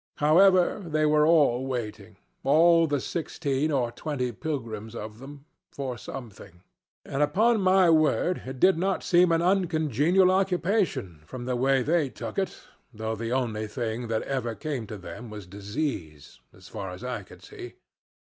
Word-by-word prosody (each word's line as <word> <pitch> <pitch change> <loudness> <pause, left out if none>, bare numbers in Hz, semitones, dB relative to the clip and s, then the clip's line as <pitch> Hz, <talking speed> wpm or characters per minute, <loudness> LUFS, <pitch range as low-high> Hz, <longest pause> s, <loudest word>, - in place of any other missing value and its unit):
However, 185 +6 +4
they 155 -2 0
were 150 0 +4
all 140 -6 +3
waiting 120 -5 -5 0.3
all 165 +3 +5
the 145 -2 0
sixteen 150 -1 -2
or 125 -4 0
twenty 130 -3 -3
pilgrims 115 -6 -5
of 110 0 -7
them 140 +2 -11 0.3
for 135 -3 -4
something; 100 -6 -10 0.4
and 135 - -3
upon 215 +9 +3
my 185 -1 +4
word 160 +3 +2
it 130 -1 -7
did 185 +1 +4
not 190 +1 0
seem 175 0 +4
an 165 0 +2
uncongenial 175 - +2
occupation, 185 - 0
from 120 +6 -7
the 125 0 -1
way 130 +1 +2
they 155 -1 +1
took 115 - -5
it, 190 - -3 0.3
though 110 -1 -4
the 115 +1 -4
only 115 -4 -1
thing 115 +1 -4
that 110 -1 -1
ever 125 -4 -3
came 140 -7 -4
to 105 - -7
them 115 +5 -9
was 105 -2 -8
disease 100 - -5
as - - -16
far 95 - -6
as 90 +5 -9
I 125 -4 -3
could 95 - -16
see. - - -10
135 Hz, 160 wpm, -26 LUFS, 115-165 Hz, 0.4 s, all